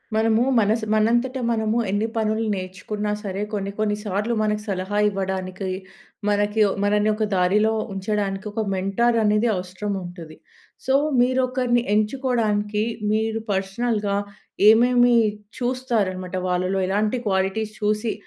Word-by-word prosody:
మనము 225 +1 +3 0.2
మనసు 220 +1 +1
మనంతట, 235 +4 +2 0.2
మనము 220 0 0
ఎన్ని 205 +3 0
పనులు 220 0 0
నేర్చుకున్నా 190 +3 -4
సరే, 195 0 -4
కొన్ని 200 -1 -2
కొన్ని 210 -1 +1
సార్లు 210 +3 -1
మనకు 210 0 0
సలహా 190 +1 -2
ఇవ్వడానికి, 190 -1 -3 0.6
మనకి 205 +1 +1
ఓ - - -1
మనల్ని 210 +1 +2
ఒక 215 - -1
దారిలో 205 +5 +3 0.2
ఉంచడానికి 195 0 -2
ఒక 220 - -2
మెంటార్ 195 +5 +1
అనేది 210 +2 +3
అవసరం 185 +3 -4
ఉంటుది. 170 -3 -10 0.5
సో, 265 - +1 0.3
మీరొకరిని 250 -1 +1
ఎంచుకోవడానికి, 215 -3 0 0.3
మీరు 220 +1 0
పర్సనల్‌గా 200 +1 -1 0.5
ఏమేమి 245 +2 +5 0.4
చూస్తారనమాట, 220 -8 -1
వాళ్ళలో 185 +2 0
ఎలాంటి 210 +5 0
క్వాలిటీస్ 195 +3 0
చూసి 210 +2 0
210 Hz, 120 wpm, -23 LUFS, 195-225 Hz, 0.6 s, ఏమేమి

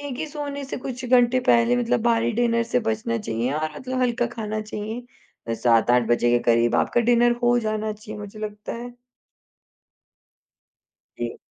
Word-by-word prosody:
ये 285 - -6
ही 315 - -2
सोने 285 -2 -5
से 270 - -5
कुछ 255 0 -6
घंटे 245 0 +4
पहले 235 +1 +4
मतलब 240 -1 +1
भारी 235 0 +2
डिनर 235 0 +2
से 240 +1 0
बचना 225 +1 -1
चाहिए 120 - -2
और 155 -1 -3
मतलब 255 0 -3
हल्का 240 -1 +1
खाना 215 -2 -4
चाहिए, 215 - -7
7-8 120 +1 +3
बजे 120 0 +3
के 120 - +4
करीब 115 0 +3
आपका 240 - +2
डिनर 240 +1 +4
हो 240 0 +4
जाना 215 -1 -2
चाहिए 215 0 -9
मुझे 205 +1 -9
लगता 210 -1 -6
है। 240 +1 -6 2.3
जी। - - -5
230 Hz, 160 wpm, -23 LUFS, 210-245 Hz, 2.3 s, घंटे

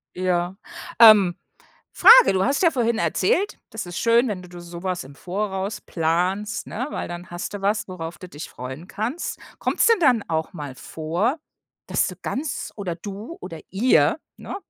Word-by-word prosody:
Ja. 180 0 0 0.4
Ähm, 210 -6 +8 0.6
Frage, 485 - +8
du 190 0 +2
hast 275 +2 +1
ja 335 - +6
vorhin 235 -4 0
erzählt, 185 - +1
das 220 -2 -5
ist 175 0 -7
schön, 235 +2 +4
wenn 200 -5 -3
d 180 - -13
du 175 0 -10
so 170 0 -9
was 185 -1 -2
im 140 +1 -13
Voraus 195 +3 -3
planst, 180 +5 -1
ne? 250 +5 -4
Weil - - -4
dann 175 +1 -8
hast 175 +3 -5
du 205 - -6
was, 205 +2 0
worauf 170 -3 -7
du 185 - -10
dich 150 -1 -8
freuen 130 +7 -8
kannst. 240 - -4 0.2
Kommt's - - +2
denn 460 -3 +4
dann 250 - +4
auch 160 +2 -2
mal 145 -6 -7
vor, 170 - -2 0.5
dass - - +1
du - - -6
ganz 290 +2 -4
oder 185 -5 -4
du 205 - -8
oder 165 - -7
ihr, 195 - +3 0.2
ne? - - -7
190 Hz, 180 wpm, -23 LUFS, 175-225 Hz, 0.6 s, Ähm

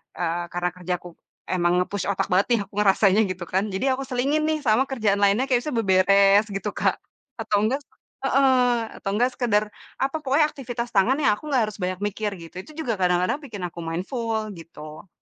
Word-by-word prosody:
e 180 - -4 0.3
kerena 175 0 -1
kerjaku 180 0 -4 0.4
emang 175 -1 +1
nge-push 200 +1 -4
otak 190 - -1
banget 185 +2 +3
nih - - -2
aku 200 - -37
ngerasanya, 200 0 +4
gitu 185 -1 -6
kan, 190 +1 +1
jadi 195 - -1
aku 270 - -5
selingin 275 +4 0
nih 310 0 0
sama 220 +3 +4
kerjaan 215 -6 +1
lainnya 200 +6 +3
kayak 245 -1 +3
bisa 300 - -2
beberes 195 -1 +5
gitu 195 - -3
Kak, - - +1 0.4
atau 220 -2 0
enggak 260 +6 0 0.4
heeh, 255 -4 +2
atau 195 - -4
enggak 245 +4 +3
sekedar 215 -4 +2 0.4
apa 270 +3 -1
pokoknya 280 +3 +3
aktivitas 245 -3 -5
tangan 200 +7 +4
yang 275 - +4
aku 305 - -10
nggak 260 -4 +3
harus - - -13
banyak 185 0 -2
mikir 210 +1 -2
gitu. 165 0 -12
Itu - - -15
juga 250 -8 -1
kadang-kadang 180 +8 +1
bikin 215 -9 -7
aku 170 - -11
mindful, 215 +6 -3
gitu. 155 +1 -11
210 Hz, 190 wpm, -24 LUFS, 185-250 Hz, 0.4 s, beberes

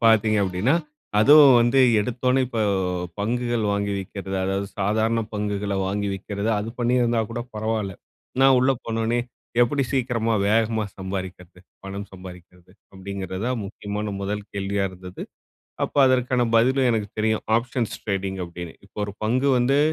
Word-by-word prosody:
பாத்தீங்க 110 -1 +4
அப்டீன்னா, 95 - +1 0.5
அதுவும் 140 +2 +8
வந்து 120 +3 +4 0.2
எடுத்த 115 +3 -4
உடனே 130 +1 +3
இப்போ 120 -2 -3 0.6
பங்குகள் 120 +1 -1
வாங்கி 100 0 -1
விற்கிறது, 95 0 -5
அதாவது 95 +1 -1
சாதாரண 110 +3 +1
பங்குகள 105 -1 -2
வாங்கி 100 +1 -1
விற்கிறது. 100 +2 -4
அது 105 +2 -4
பண்ணியிருந்தா 120 -1 +2
கூட 120 - -3
பரவால்ல. 110 -2 -2 0.5
நான் 135 -1 +6
உள்ள 130 +2 +3
போன 115 0 -2
உடனே, 120 +2 +1 0.4
எப்படி 140 +4 +1
சீக்கிரமா 120 -4 0
வேகமா 110 0 +2
சம்பாதிக்கிறது, 95 -2 -6 0.3
பணம் 100 +1 -6
சம்பாதிக்கிறது, 90 -1 -13 0.2
அப்படிங்கின்றத 95 +2 -5 0.2
முக்கியமான 105 +1 -5
முதல் 105 +1 -3
கேள்வியா 100 0 -1
இருந்தது. 90 0 -9 0.6
அப்போ - - -4
அதற்கான 125 -1 +2
பதிலும் 130 +3 +4
எனக்கு 110 -3 -1
தெரியும், 110 0 0
ஆப்ஷன்ஸ் 115 -1 -1
டிரேடிங் 95 -1 -2
அப்டீன்னு. 85 -1 -8
இப்போ 100 - -23
ஒரு 100 - -6
பங்கு 125 +5 +1
வந்து 125 +3 +3
105 Hz, 140 wpm, -24 LUFS, 95-120 Hz, 0.6 s, அதுவும்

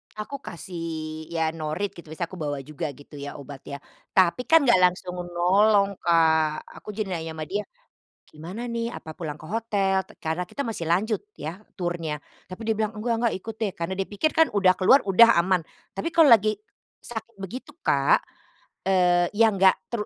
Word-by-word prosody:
Aku 240 +6 -6
kasih, 165 - -6
ya 165 -1 0
norit 165 +5 -3
gitu 170 -4 -13
bisa 160 +3 -5
aku 185 - -9
bawa 145 -3 -3
juga 155 +3 -5
gitu 145 0 -13
ya 145 0 -6
obat 140 -1 -9
ya. 140 - -5 0.4
Tapi 190 +7 +3
kan 325 -2 +6
gak 240 -8 +5
langsung 180 0 +2
menolong, 195 +3 +2
Kak. 160 -2 +3 0.2
Aku - - -12
jadi 210 -4 -3
nanya 165 -2 -4
sama 155 - -4
dia, 205 +2 -1 0.7
"Gimana 180 +10 -7
nih 235 -1 -2
apa 160 - -8
pulang 155 -2 -6
ke - - -11
hotel?" 200 -4 0 0.2
karena 160 +3 -2
kita 280 - -4
masih 215 -8 -4
lanjut 210 +6 +1 0.2
ya, 170 +6 -6 0.2
turnya. 175 -4 -2 0.3
Tapi 185 +4 -9
dia 220 - +2
bilang, 215 0 -1
"Enggak 230 +2 -1
enggak - - -3
ikut 220 +3 -7
deh." 205 -4 0
Karena 170 +2 -3
dia 195 - -2
pikir 210 +10 0
kan 320 0 +5
udah 185 -2 +5
keluar, 200 +9 +6
udah 230 +5 +7
aman. 180 +1 +3 0.3
Tapi 195 +12 -2
kalau 320 -7 +6
lagi 215 -1 +5 0.5
sakit 230 -1 -7
begitu 235 +9 -7
Kak, 140 -1 +3 0.7
eee, 180 -2 +4
ya 225 +1 +6
enggak, 190 0 +5 0.2
tru 235 -3 -1
185 Hz, 180 wpm, -25 LUFS, 165-215 Hz, 0.7 s, udah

